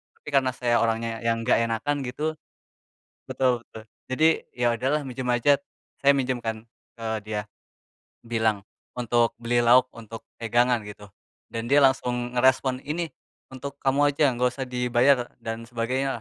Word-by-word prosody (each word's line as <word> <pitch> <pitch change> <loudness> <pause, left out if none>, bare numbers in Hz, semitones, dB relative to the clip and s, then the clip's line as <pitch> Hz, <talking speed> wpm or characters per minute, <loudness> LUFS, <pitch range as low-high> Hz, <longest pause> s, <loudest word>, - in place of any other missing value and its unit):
Tapi - - -30
karena 130 -2 +2
saya 120 -2 +1
orangnya 115 0 -1
yang 115 0 -1
enggak 125 - +3
enakan 115 +6 -1
gitu 150 +5 -2 1.0
betul 125 -2 +1
betul, 110 -1 -12 0.3
jadi, 155 +5 +3 0.3
ya 120 -1 +2
udahlah 135 +6 0
minjem 130 -1 -5
aja, 125 +4 +3 0.4
saya 140 0 +5
minjem 130 -2 -1
kan 110 -1 -4 0.3
ke 115 -1 -6 0.2
dia. 105 -1 -3 0.8
Bilang 110 -3 0 0.3
untuk 120 -1 +2
beli 120 +1 +1
lauk, 125 +2 +6
untuk 115 0 -9 0.2
pegangan 120 +1 +2
gitu. 105 0 -10 0.4
Dan 115 0 -5
dia 145 - +7
langsung 125 -2 +1
ngerespon, 130 +1 +3
"Ini 165 +2 -3 0.4
untuk 135 +2 -7
kamu 145 +2 +2
aja, 140 -1 +3
enggak 125 +1 +1
usah 135 - -3
dibayar," 125 +1 +2 0.2
dan 115 0 -4
sebagainya 125 +3 -1
125 Hz, 150 wpm, -25 LUFS, 115-130 Hz, 1.0 s, dia